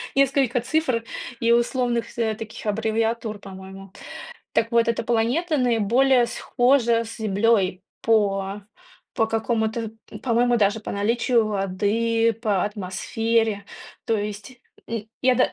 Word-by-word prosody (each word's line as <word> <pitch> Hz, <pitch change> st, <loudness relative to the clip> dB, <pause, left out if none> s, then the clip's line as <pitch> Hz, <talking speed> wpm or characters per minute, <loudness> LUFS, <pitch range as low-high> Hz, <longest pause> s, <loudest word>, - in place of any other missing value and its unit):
несколько 270 Hz, -2 st, +3 dB
цифр, 255 Hz, -4 st, 0 dB, 0.4 s
и 230 Hz, 0 st, +2 dB
условных 240 Hz, 0 st, 0 dB
таких 225 Hz, -1 st, -3 dB
аббревиатур, 220 Hz, 0 st, -1 dB
по-моему. 195 Hz, 0 st, -11 dB, 0.6 s
Так 230 Hz, -, +1 dB
вот 235 Hz, -1 st, +3 dB
эта 230 Hz, -, 0 dB
планета 240 Hz, +9 st, +1 dB
наиболее 245 Hz, +1 st, +3 dB
схожа 245 Hz, -2 st, +2 dB
с 225 Hz, -, -9 dB
Землёй 200 Hz, -3 st, +1 dB, 0.2 s
по 200 Hz, -2 st, +1 dB, 0.5 s
по 225 Hz, -, +2 dB
какому 225 Hz, 0 st, 0 dB
то, 225 Hz, -1 st, -4 dB, 0.2 s
пм -, -, -8 dB
по-моему 240 Hz, 0 st, +2 dB
даже 210 Hz, 0 st, +2 dB
по -, -, -6 dB
наличию 230 Hz, +3 st, +1 dB
воды, 215 Hz, +3 st, +1 dB
по 205 Hz, -5 st, +1 dB
атмосфере. 210 Hz, +2 st, -1 dB, 0.4 s
То 225 Hz, -, +2 dB
есть, 210 Hz, +4 st, -6 dB, 0.3 s
м, 225 Hz, -2 st, -4 dB, 0.2 s
я 255 Hz, 0 st, +4 dB
да -, -, +2 dB
225 Hz, 125 wpm, -23 LUFS, 210-235 Hz, 0.6 s, я